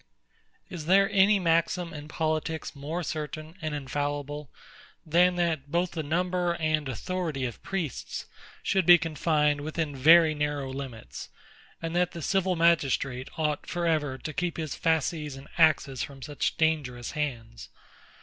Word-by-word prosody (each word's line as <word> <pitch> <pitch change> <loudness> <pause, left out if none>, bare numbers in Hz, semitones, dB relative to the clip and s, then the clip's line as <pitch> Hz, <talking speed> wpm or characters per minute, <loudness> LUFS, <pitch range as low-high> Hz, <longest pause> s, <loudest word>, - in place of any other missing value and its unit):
Is 165 -4 -7
there 195 +2 +5
any 200 +1 +5
maxim 170 0 +1
in 150 -1 -8
politics 155 0 -2
more 155 +5 -4
certain 155 0 -5
and 155 -1 -2
infallible, 145 +1 -3 0.6
than 175 +3 +4
that 160 -5 -1
both 175 +1 +1
the 165 - -3
number 175 +3 0
and 155 -3 0
authority 155 - -3
of 120 - -6
priests 175 - -4 0.4
should 190 -3 +1
be 175 0 +10
confined 150 -3 +1
within 155 -1 -3
very 160 +4 +7
narrow 145 -2 -2
limits; 130 -5 -7 0.5
and 165 +1 -3
that 180 0 +1
the 170 - -6
civil 190 +1 +1
magistrate 140 -6 +2
ought, 150 -2 -1
for 175 -1 -2
ever, 150 -5 +1
to 155 - -6
keep 175 +2 -2
his 155 -3 -3
fasces 160 -3 0
and 135 +1 -11
axes 145 -5 +3
from 135 -2 -6
such 145 -1 -2
dangerous 145 -7 0
hands? 115 - -4
155 Hz, 145 wpm, -28 LUFS, 145-170 Hz, 0.6 s, be